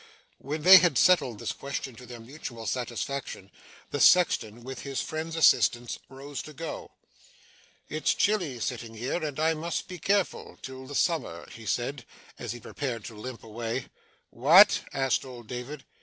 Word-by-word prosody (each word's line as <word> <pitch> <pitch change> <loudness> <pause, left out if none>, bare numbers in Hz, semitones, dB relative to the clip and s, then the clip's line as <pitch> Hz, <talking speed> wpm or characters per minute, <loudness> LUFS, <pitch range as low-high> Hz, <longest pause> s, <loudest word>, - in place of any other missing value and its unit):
When 150 +3 -5
they 190 +2 +11
had 170 -6 +3
settled 150 - +4
this - - -3
question 140 -2 -5
to 125 - -12
their 120 0 -9
mutual 120 -2 -8
satisfaction, 120 -2 -4 0.4
the 145 - -2
sexton, 120 -9 +4
with 130 0 -7
his 135 -1 -4
friend's 160 0 -4
assistance, 120 -6 +3
rose 135 0 -7
to 155 - -11
go. 160 +2 -6 1.0
'It's 155 +1 0
chilly, 180 - +1
sitting 115 0 -4
here, 125 +9 -3
and 150 -2 -4
I 160 +1 +3
must 170 +4 -3
be 180 -1 -8
careful 195 +4 0
till 130 0 -8
the 145 - -7
summer,' 155 - -1
he 115 -1 -11
said, 125 +5 -2 0.4
as - - -4
he 120 - -6
prepared 120 -2 -5
to 115 - -8
limp 115 +3 -8
away. 115 +2 -4 0.4
'What?' 170 - +7
asked 135 -2 +1
old 125 -3 -10
David. 125 +5 -7
135 Hz, 160 wpm, -28 LUFS, 120-155 Hz, 1.0 s, they